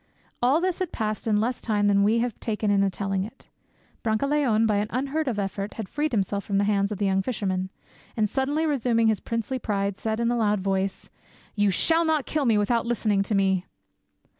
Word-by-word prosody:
All! 260 +6 +4
this 365 0 -1
had 370 -3 -2
passed 215 0 -3
in 210 -1 +3
less 240 +3 -1
time 210 -2 0
than 200 -1 +4
we 215 +3 +3
have 240 - -6
taken 210 -2 -1
in 200 -1 +3
telling 195 0 -2
it. 225 +7 -11 0.5
Brancaleone 230 0 +1
by 210 -2 +2
an 205 +1 0
unheard 275 +5 -2
of 235 -5 -1
effort 200 0 -3
had 220 -4 -5
freed 300 +6 -2
himself 200 -2 -1
from 200 - -1
the 200 - +3
hands 200 0 +1
of 210 - -3
the 205 - 0
young 195 0 +2
fisherman, 190 -4 -2 0.5
and 215 -1 +2
suddenly 285 +7 0
resuming 240 -6 +2
his 220 - +1
princely 230 +3 -3
pride, 200 -3 -2
said 220 0 -2
in 235 0 +1
a - - +1
loud 210 -2 +2
voice, 195 0 -2 0.4
"You 205 -1 +2
shall 325 - +3
not 315 -4 +1
kill 300 -2 -1
me 225 -3 +3
without 230 +3 +1
listening 215 -4 +1
to 200 +2 -1
me." 190 -2 +1
215 Hz, 210 wpm, -25 LUFS, 200-245 Hz, 0.5 s, All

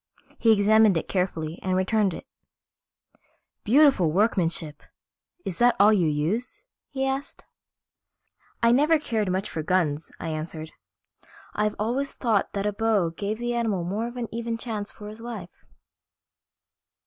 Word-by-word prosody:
He 230 - +4
examined 215 -2 +5
it - - -3
carefully 170 -4 -2
and 185 -1 0
returned 190 -1 +1
it. - - -9 1.4
"Beautiful 255 - +4
workmanship. 170 -6 0 0.6
Is 180 - -4
that 240 0 +5
all 210 +2 +7
you 180 -6 +2
use?" 160 - -2 0.3
he 270 -1 -2
asked. 270 +1 -4 1.2
"I 230 - +6
never 300 +6 +4
cared 220 -9 -1
much 190 +2 -1
for 160 - -4
guns," 160 -3 0
I 165 - -4
answered. 155 0 -5 0.8
"I've 210 0 0
always 245 +7 -1
thought 220 -5 +1
a 205 +1 -1
bow 205 -5 +1
gave 205 +5 -3
the 240 +1 -2
animal 220 -7 0
more 205 +7 -2
of 240 +1 -9
an 240 -2 -3
even 230 0 -3
chance 220 -3 -4
for 210 - -11
his 215 +2 -9
life." 220 -7 -9
210 Hz, 140 wpm, -25 LUFS, 180-235 Hz, 1.4 s, all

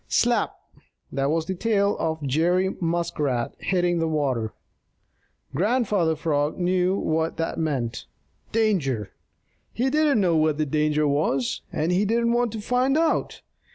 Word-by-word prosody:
Slap! - - +1 0.6
That 135 +1 0
was 160 +1 0
the 190 - -2
tail 200 +1 +1
of 160 -1 -2
Jerry 175 +7 +1
Muskrat 150 -7 -1
hitting 175 -2 +1
the 165 - +1
water. 135 -8 -1 1.0
Grandfather 200 - +1
Frog 150 -2 -1
knew 180 +1 +1
what 160 -1 -1
that 165 0 -2
meant 130 -7 -2 0.4
danger! 155 - 0 0.6
He 260 +3 0
didn't 300 -4 +3
know 180 -4 +2
what 155 -1 +2
the 155 - +1
danger 150 +1 +1
was, 140 -3 0
and 160 +3 -1
he 185 +3 +2
didn't 235 +2 +1
wait 240 0 +2
to 220 - -4
find 250 +5 +1
out. 325 0 0
165 Hz, 140 wpm, -24 LUFS, 150-205 Hz, 1.0 s, didn't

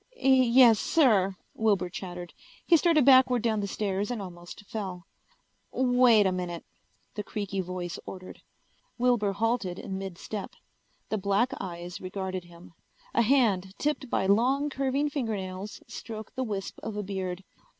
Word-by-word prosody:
"Yes, 255 - +6
sir," 210 - +3 0.2
Wilbur 205 -4 +1
chattered. 175 -1 -7 0.3
He 345 - +6
started 320 -4 +4
backward 255 -3 +6
down 220 -2 +1
the 200 - -2
stairs 200 +1 -2
and 245 -2 -3
almost 175 +1 -9
fell. 190 -5 -5 0.7
"Wait 245 -4 +4
a 190 - +3
minute," 180 -2 -4 0.5
the 210 - -4
creaky 200 -2 -3
voice 180 -1 -5
ordered. 185 -1 -9 0.6
Wilbur 240 -5 +2
halted 205 -3 -1
in 190 -1 -5
mid 190 -3 -6
step. 205 0 -6 0.5
The 215 - -1
black 200 +6 +1
eyes 175 -1 -6
regarded 185 -1 -4
him. 170 0 -15 0.4
A 235 - +3
hand 210 -7 +2
tipped 295 -3 -2
by 190 - 0
long, 260 +9 +2
curving 275 +2 0
fingernails 210 -8 -4
stroked 220 -2 -8
the 260 - -1
wisp 205 -5 -4
of 215 -1 -5
a 210 - -2
beard. 190 -1 -4
205 Hz, 145 wpm, -28 LUFS, 185-245 Hz, 0.7 s, Yes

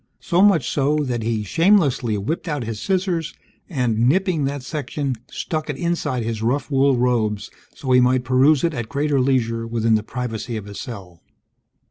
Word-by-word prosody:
So 175 0 +1
much 195 -10 +4
so, 145 +1 +1
that 125 -4 -2
he 110 -1 -1
shamelessly 140 - +2
whipped 155 - -3
out 145 -5 -2
his 110 -2 -5
scissors 185 -3 -1 0.3
and, 120 - +1
nipping 180 -2 +1
that 140 -1 -3
section, 140 -1 -3 0.2
stuck 155 -1 -4
it 145 - -2
inside 170 -8 -1
his 110 -1 -3
rough 130 +6 -1
wool 135 -1 +3
robes 115 -4 0 0.2
so 130 - -4
he 125 0 +6
might 125 0 +3
peruse 130 +3 +4
it 170 -2 +1
at 120 -5 -4
greater 145 0 0
leisure 115 -3 0
within 115 -1 +1
the 110 - +3
privacy 115 0 -4
of 105 - -7
his 100 -1 -8
cell. 95 -9 -9
130 Hz, 175 wpm, -21 LUFS, 115-150 Hz, 0.3 s, he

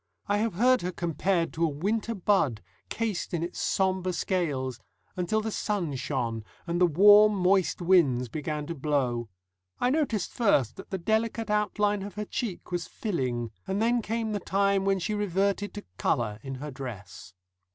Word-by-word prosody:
I 205 - +2
have 215 -2 -1
heard 250 +5 +4
her 180 - -2
compared 170 0 0
to 165 - -1
a - - +4
winter 210 +10 -1
bud, 175 - +1 0.3
cased 220 -6 -2
in 165 - -1
its 175 - -5
sombre 185 -1 0
scales, 140 - -1 0.4
until 185 +5 0
the 220 0 -3
sun 200 -8 -1
shone, 125 -4 -2 0.2
and 175 0 -1
the 180 - +7
warm, 205 +5 +7
moist 185 -1 +2
winds 145 -9 +4
began 150 +3 -4
to 170 - -4
blow. 130 -6 -1 0.5
I 250 - +2
noticed 270 - 0
first 145 - +2
that - - -10
the 190 - -2
delicate 220 +3 0
outline 210 -1 +1
of 200 +1 -7
her 210 0 -3
cheek 200 -5 -4
was 175 -1 -2
filling, 125 - -2 0.2
and 195 +1 -1
then 235 +2 +2
came 225 0 -2
the 205 - -1
time 200 0 +1
when 195 0 +3
she 190 +4 -2
reverted 200 0 0
to 205 - -7
colour 110 -3 0
in 135 +2 -6
her 145 +3 -6
dress. 105 - -8
185 Hz, 170 wpm, -28 LUFS, 145-210 Hz, 0.5 s, the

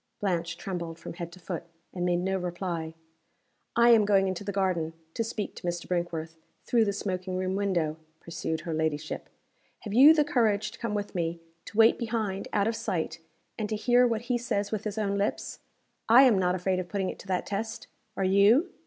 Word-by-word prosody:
Blanche 170 -5 -1
trembled 170 -4 -5
from - - -8
head 170 0 -6
to 185 - -13
foot, 175 -1 -4 0.3
and 180 - -3
made 180 0 +2
no 190 +2 -1
reply. 175 -3 -3 0.8
"I 235 0 +6
am 225 -2 +7
going 195 -2 +3
into 185 +1 -3
the 200 - -3
garden, 185 -5 0 0.2
to 230 - -1
speak 215 -2 -4
to - - -6
Mr. 175 0 -3
Brinkworth 165 -2 -3 0.3
through 230 -2 +3
the 200 - +1
smoking 185 -2 -3
room 185 0 -1
window," 175 -6 0 0.2
pursued 160 -1 -4
her 165 +1 -4
ladyship. 155 -1 -2 0.5
"Have 205 - -6
you 280 +7 +8
the 300 - +4
courage 220 -7 +1
to 230 - -13
come 230 -3 -2
with 205 0 -3
me; 170 -2 -2 0.3
to - - -10
wait 225 0 +6
behind 220 -5 -2
out 205 0 +2
of 225 - 0
sight; 165 -6 -3 0.4
and 210 -1 -2
to 220 - -1
hear 245 +3 +4
what 225 -2 -1
he 240 0 -1
says 205 -4 -2
with 215 -1 -3
his 210 0 -3
own 200 -2 0
lips? 200 - -2 0.5
I 245 +4 +9
am 235 -7 +5
not 180 -1 +2
afraid 185 0 0
of 180 -1 -5
putting 190 -1 -1
it - - -12
to - - -12
that 185 -1 -1
test. 220 +3 -4 0.3
Are - - 0
you?" 200 - +4
195 Hz, 205 wpm, -28 LUFS, 175-220 Hz, 0.8 s, I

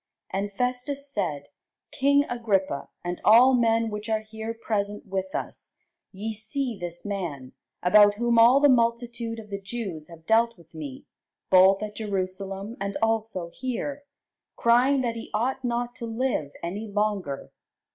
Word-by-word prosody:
And 200 +1 -2
Festus 250 +5 -2
said, 150 - -3 0.4
King 280 +1 +3
Agrippa, 195 -10 -1
and 175 0 -4
all 245 +5 +7
men 230 -2 +2
which 210 +1 -5
are 220 -1 +1
here 220 +1 -6
present 210 -2 -3
with 190 -1 -3
us, - - -6 0.4
ye 215 +3 -4
see 245 +3 -3
this 175 -1 -7
man, 170 -11 -4 0.3
about 205 +3 +6
whom 235 +1 +2
all 240 +4 +7
the 290 - +6
multitude 235 -2 +1
of 215 -2 -10
the 200 0 -4
Jews 195 -7 -5
have 165 -1 -14
dealt 230 +2 +3
with 165 -1 -20
me, 145 -5 -8 0.5
both 190 +2 +6
at 210 -1 -6
Jerusalem, 195 +1 -4
and 200 0 -2
also 220 -6 0
here, 260 +3 -4 0.5
crying 250 +4 +4
that 235 -2 -2
he 225 - -7
ought 260 +4 -1
not 240 0 -1
to 235 - -5
live 225 - -1
any 200 +6 -4
longer. 205 -8 -2
220 Hz, 150 wpm, -26 LUFS, 195-235 Hz, 0.5 s, all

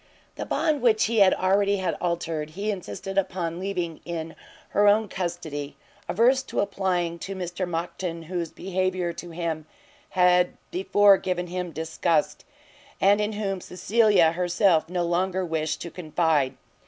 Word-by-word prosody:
The - - -6
bond 310 -3 +1
which 225 -3 +4
he 225 0 +1
had 195 -2 +6
already 200 +2 +2
had 185 -3 -1
altered, 165 -3 -2
he 200 +7 -3
insisted 195 - -3
upon 175 -3 -3
leaving 180 -4 -3
in 165 -1 -5 0.3
her 205 0 +3
own 210 +1 +4
custody, 165 -6 -5 0.3
averse 245 +7 +4
to 265 - -4
applying 180 -4 -1
to 195 +3 -5
Mr 180 0 -3
Monckton, 170 0 -4
whose 170 0 -3
behaviour 185 -1 -2
to 175 +1 -8
him 165 -2 -4 0.4
had 180 -1 +3
before 200 +2 +4
given 180 -1 -2
him 180 0 -4
disgust, 165 +4 -1 0.5
and 200 +2 +4
in 210 +1 -1
whom 195 -3 -3
Cecilia 190 -2 +3
herself 175 -1 +2
no 180 -1 -1
longer 185 +2 0
wished 160 -2 -2
to 170 - -6
confide. 155 -5 0
180 Hz, 145 wpm, -25 LUFS, 170-195 Hz, 0.5 s, had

